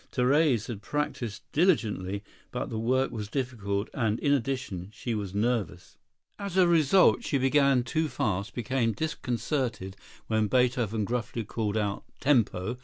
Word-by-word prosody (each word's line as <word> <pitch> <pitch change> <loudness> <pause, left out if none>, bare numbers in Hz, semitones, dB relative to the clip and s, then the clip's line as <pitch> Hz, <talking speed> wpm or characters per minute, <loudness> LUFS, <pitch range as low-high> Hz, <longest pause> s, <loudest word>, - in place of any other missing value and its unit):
Therese 130 -2 +2
had 115 -5 -6
practised 120 -5 -3
diligently, 105 - +1 0.3
but - - -4
the 110 - -2
work 130 +4 +1
was 110 -4 -5
difficult 110 -5 -2
and, 110 -4 0
in 145 - +2
addition, 125 -9 -2
she 120 +2 -4
was 100 -3 -4
nervous. 105 -5 -2 0.4
As 200 -2 -4
a 185 -2 +6
result 170 - +5
she 145 - 0
began 135 -1 +3
too 155 +5 -1
fast, 110 -7 -2
became 120 -1 0
disconcerted 120 -6 -2 0.3
when 110 -1 +1
Beethoven 120 -2 +1
gruffly 115 0 -2
called 110 0 -2
out 100 -2 -1 0.2
"Tempo!" 120 -4 +1
120 Hz, 140 wpm, -28 LUFS, 105-135 Hz, 0.4 s, a